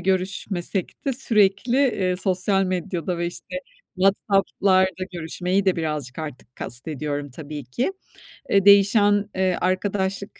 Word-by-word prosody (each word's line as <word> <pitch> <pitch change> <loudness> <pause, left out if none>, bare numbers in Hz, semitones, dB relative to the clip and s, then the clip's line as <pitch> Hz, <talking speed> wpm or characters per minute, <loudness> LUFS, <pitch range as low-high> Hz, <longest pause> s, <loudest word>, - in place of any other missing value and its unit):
görüşmesek 185 0 -2
de 275 - +1
sürekli, 220 -1 +2
eee, 195 -10 +1
sosyal 190 +1 +1
medyada 180 -1 -2
ve, 170 - -1
işte, 175 - -7 0.4
WhatsApp'larda 190 -1 +2
görüşmeyi 180 +3 -1
de 190 -2 +2
birazcık 150 -5 -3
artık 145 -5 -8
kastediyorum 145 +2 -2
tabii 145 +1 -8
ki. 240 - -2 0.6
Eee, 195 -1 +3
değişen, 205 0 +5
eee, 185 -1 +1
arkadaşlık 190 +1 -1
185 Hz, 115 wpm, -23 LUFS, 170-200 Hz, 0.6 s, değişen